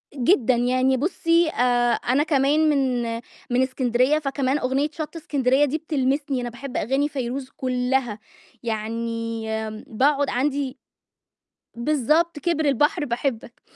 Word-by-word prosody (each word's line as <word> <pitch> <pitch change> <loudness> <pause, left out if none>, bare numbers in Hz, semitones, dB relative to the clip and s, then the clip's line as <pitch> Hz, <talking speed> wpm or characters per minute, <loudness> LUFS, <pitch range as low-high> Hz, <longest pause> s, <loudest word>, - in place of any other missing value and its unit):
جدًا، 255 - +3
يعني 255 +2 +2
بُصّي 335 +2 +2
آآ، 245 -4 +2
أنا 265 +5 +1
كمان 300 +1 +2
من 260 -4 +1 0.5
من 245 +1 +2
إسكندرية 255 +2 +1
فكمان 275 -1 -1
أغنية 270 +4 0
شط 310 +1 -6
إسكندرية 280 -3 +2
دي 290 +3 -1
بتلمسني، 280 -3 -1
أنا 245 - -3
باحب 250 +3 -7
أغاني 270 +6 0
فيروز 260 -1 -4
كلّها 250 -3 -1 0.4
يعني 230 0 -3
آمم، 220 0 -4
باقعد 280 +5 +2
عَندي 275 +1 -1 1.0
بالضبط 300 +5 +1
كِبر 315 0 0
البحر 295 +4 +2
باحبك، 235 -2 -3
265 Hz, 120 wpm, -23 LUFS, 245-295 Hz, 1.0 s, جدًا